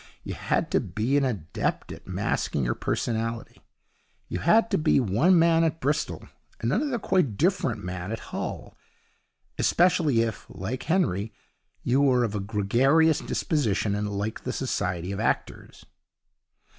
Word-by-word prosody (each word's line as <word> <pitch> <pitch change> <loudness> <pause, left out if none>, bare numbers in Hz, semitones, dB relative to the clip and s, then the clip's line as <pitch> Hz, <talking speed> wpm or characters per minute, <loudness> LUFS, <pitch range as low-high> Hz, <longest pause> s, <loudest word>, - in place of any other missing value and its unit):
You - - -5
had - - -1
to - - +3
be 115 +6 -1
an 145 - +3
adept 105 -12 -2
at - - -11
masking 70 - -1
your - - +1
personality. 115 0 -3 0.7
You 90 - -3
had 220 - +3
to - - +2
be 155 -2 +3
one 135 - +3
man 165 0 +4
at 160 0 0
Bristol 145 +3 -2 0.3
and 115 +4 0
another 275 0 0
quite 180 - +1
different 170 - 0
man 90 +2 -5
at 115 - -7
Hull - - -5 0.8
especially 165 -8 +3
if, 115 -1 -3
like 110 +8 -5
Henry, 115 - 0 0.5
you 130 +3 +2
were 130 -3 +4
of 110 -3 -1
a 105 - -2
gregarious 125 +11 +3
disposition, 110 - 0
and 105 0 -2
liked 105 +2 -3
the - - -3
society 90 0 -2
of 100 - -4
actors. - - -3
120 Hz, 145 wpm, -26 LUFS, 100-160 Hz, 0.8 s, man